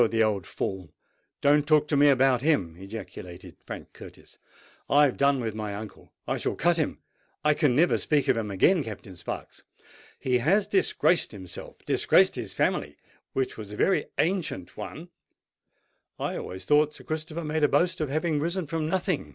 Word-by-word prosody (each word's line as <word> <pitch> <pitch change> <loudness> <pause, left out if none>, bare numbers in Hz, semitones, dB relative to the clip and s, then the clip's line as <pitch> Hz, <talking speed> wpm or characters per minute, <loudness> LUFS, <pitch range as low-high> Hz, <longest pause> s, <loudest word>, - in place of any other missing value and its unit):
the 115 -1 +2
old 105 -4 0
fool—don't 140 - -2
talk 150 -1 +4
to 150 - 0
me 145 +1 +6
about 130 -2 +4
him!" 100 - +1
ejaculated 95 -2 -9
Frank - - -9
Curtis. - - -14 0.5
"I 145 +1 +6
have 135 - 0
done 140 -1 +3
with 115 -3 -3
my 105 -2 -4
uncle—I 110 0 -7
shall - - -2
cut 175 0 +2
him—I 150 -1 -2
can 145 -5 +2
never 170 +5 +3
speak 150 -2 +1
to - - +4
him 110 -2 -3
again, 155 - +3
Captain 100 -4 -8
Sparks. 85 - -7 0.6
He 125 -1 +1
has 190 - +3
disgraced 190 - +2
himself—disgraced 95 -4 +1
his - - -5
family, - - -1 0.4
which 130 -1 -1
was 105 -2 -8
a - - -5
very 190 - +2
ancient 160 - -1
one——" - - -8 1.1
"I - - -3
always 95 0 -6
thought 150 +3 +3
Sir - - -12
Christopher 155 +1 -4
made 155 0 -1
a - - +7
boast 175 +4 +1
of 155 - -1
having 155 +1 0
risen 170 +4 -1
from 155 0 -2
nothing?" 180 - -1
145 Hz, 165 wpm, -27 LUFS, 110-160 Hz, 1.1 s, a